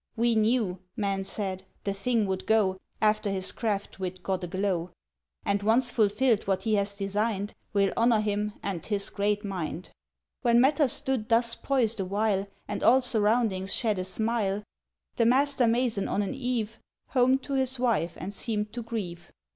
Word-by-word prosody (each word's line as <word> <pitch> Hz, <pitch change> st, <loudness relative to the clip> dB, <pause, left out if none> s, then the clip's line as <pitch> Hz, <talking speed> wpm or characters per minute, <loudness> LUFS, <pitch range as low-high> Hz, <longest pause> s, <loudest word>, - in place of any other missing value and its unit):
"We 235 Hz, 0 st, +2 dB
knew," 220 Hz, -4 st, +1 dB, 0.2 s
men 195 Hz, -2 st, -1 dB
said, 190 Hz, -2 st, -3 dB, 0.2 s
"the 200 Hz, -, -1 dB
thing 220 Hz, +2 st, 0 dB
would 190 Hz, -1 st, -3 dB
go 200 Hz, -4 st, +2 dB, 0.2 s
After 215 Hz, -1 st, +2 dB
his 190 Hz, -1 st, -3 dB
craft 205 Hz, -4 st, -3 dB
wit 185 Hz, 0 st, -5 dB
got 190 Hz, -1 st, -2 dB
aglow, 185 Hz, -1 st, -1 dB, 0.6 s
"And, 200 Hz, 0 st, +1 dB
once 235 Hz, +4 st, +3 dB
fulfilled 220 Hz, +1 st, +2 dB
what 190 Hz, -1 st, 0 dB
he 220 Hz, -, 0 dB
has 200 Hz, -1 st, +1 dB
designed, 200 Hz, +1 st, -1 dB, 0.2 s
We'll 200 Hz, -1 st, +2 dB
honour 230 Hz, -1 st, +4 dB
him 210 Hz, 0 st, -1 dB
and 185 Hz, -5 st, -3 dB
his 200 Hz, -2 st, -1 dB
great 205 Hz, +1 st, 0 dB
mind!" 180 Hz, -3 st, -4 dB, 0.5 s
When 235 Hz, -2 st, +4 dB
matters 275 Hz, +1 st, +4 dB
stood 260 Hz, -5 st, -1 dB
thus 230 Hz, 0 st, +3 dB
poised 235 Hz, -5 st, 0 dB
awhile, 200 Hz, +1 st, 0 dB, 0.2 s
And 205 Hz, -, -4 dB
all 260 Hz, +3 st, +6 dB
surroundings 215 Hz, -4 st, +2 dB
shed 215 Hz, -5 st, 0 dB
a -, -, -1 dB
smile, 210 Hz, +1 st, -1 dB, 0.5 s
The 230 Hz, -, +3 dB
master 270 Hz, 0 st, +3 dB
mason 230 Hz, -3 st, +1 dB
on 205 Hz, -, 0 dB
an 195 Hz, -, -3 dB
eve 235 Hz, -4 st, -2 dB, 0.3 s
Homed 260 Hz, +1 st, +3 dB
to 280 Hz, -, -5 dB
his 265 Hz, -1 st, +2 dB
wife 230 Hz, -9 st, 0 dB
and 195 Hz, +2 st, -6 dB
seemed 210 Hz, -1 st, -3 dB
to 240 Hz, -, -4 dB
grieve... 205 Hz, -7 st, -6 dB
210 Hz, 165 wpm, -28 LUFS, 195-235 Hz, 0.6 s, all